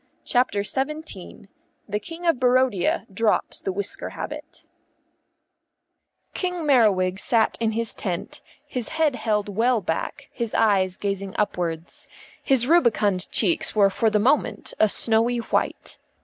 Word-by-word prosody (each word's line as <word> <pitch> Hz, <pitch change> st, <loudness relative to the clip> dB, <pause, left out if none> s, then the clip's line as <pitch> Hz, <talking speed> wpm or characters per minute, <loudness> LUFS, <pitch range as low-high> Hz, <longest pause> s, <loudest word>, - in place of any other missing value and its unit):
CHAPTER 245 Hz, -5 st, +1 dB
XVII 270 Hz, -, -4 dB, 0.4 s
THE 210 Hz, 0 st, -2 dB
KING 330 Hz, +10 st, -8 dB
OF 330 Hz, -7 st, +2 dB
BARODIA 250 Hz, -6 st, +2 dB
DROPS 220 Hz, +2 st, 0 dB
THE 190 Hz, -, -2 dB
WHISKER 200 Hz, +1 st, -3 dB
HABIT -, -, -8 dB, 1.7 s
King 360 Hz, -3 st, -3 dB
Merriwig 195 Hz, -9 st, +3 dB
sat 225 Hz, 0 st, +2 dB
in 225 Hz, -1 st, 0 dB
his 230 Hz, 0 st, -2 dB
tent, 195 Hz, +10 st, -4 dB, 0.2 s
his 250 Hz, -5 st, -4 dB
head 310 Hz, -4 st, +2 dB
held 210 Hz, -4 st, -1 dB
well 230 Hz, +4 st, +2 dB
back, 190 Hz, +10 st, -4 dB
his 235 Hz, -3 st, -4 dB
eyes 190 Hz, -4 st, +2 dB
gazing 195 Hz, -1 st, -3 dB
upwards. 175 Hz, -5 st, -3 dB, 0.3 s
His 260 Hz, -3 st, +2 dB
rubicund 220 Hz, -, +2 dB
cheeks 190 Hz, -1 st, +1 dB
were 200 Hz, -2 st, +5 dB
for 225 Hz, +3 st, +2 dB
the 215 Hz, -, +2 dB
moment 250 Hz, +8 st, +1 dB
a 215 Hz, -, +5 dB
snowy 230 Hz, +3 st, +1 dB
white. 235 Hz, -, -2 dB
220 Hz, 130 wpm, -24 LUFS, 200-255 Hz, 1.7 s, were